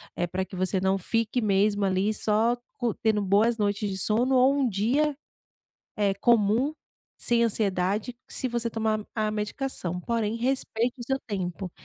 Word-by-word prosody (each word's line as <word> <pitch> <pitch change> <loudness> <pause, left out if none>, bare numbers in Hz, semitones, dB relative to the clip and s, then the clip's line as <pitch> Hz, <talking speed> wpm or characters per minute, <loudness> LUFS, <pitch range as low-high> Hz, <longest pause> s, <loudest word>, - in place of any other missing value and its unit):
eh, 175 - -1
para 185 +2 -2
que 190 - -10
você 185 +1 0
não 190 +1 +1
fique 225 +5 0
mesmo 205 0 +2
ali, 195 +2 +1
só 220 +3 +2 0.2
co 240 -3 0
tendo 215 -2 +1
boas 210 +4 +3
noites 205 -1 0
de 190 - -3
sono 235 +7 +2
ou 260 +2 +5
um 275 -3 +2
dia, 265 +9 +1 0.8
eh, 200 -2 +1
comum 235 +6 +3 0.5
sem 235 -1 +2
ansiedade 205 +1 0
se 260 - -3
você 235 -1 -2
tomar 220 -1 0 0.2
a 215 -1 0
a 215 - -1
medicação. 210 -4 -3
Porém, 225 0 -1
respeite 245 -1 -1
o - - -5
seu 265 +2 -1
tempo, 185 -3 -4
215 Hz, 165 wpm, -27 LUFS, 195-235 Hz, 0.8 s, ou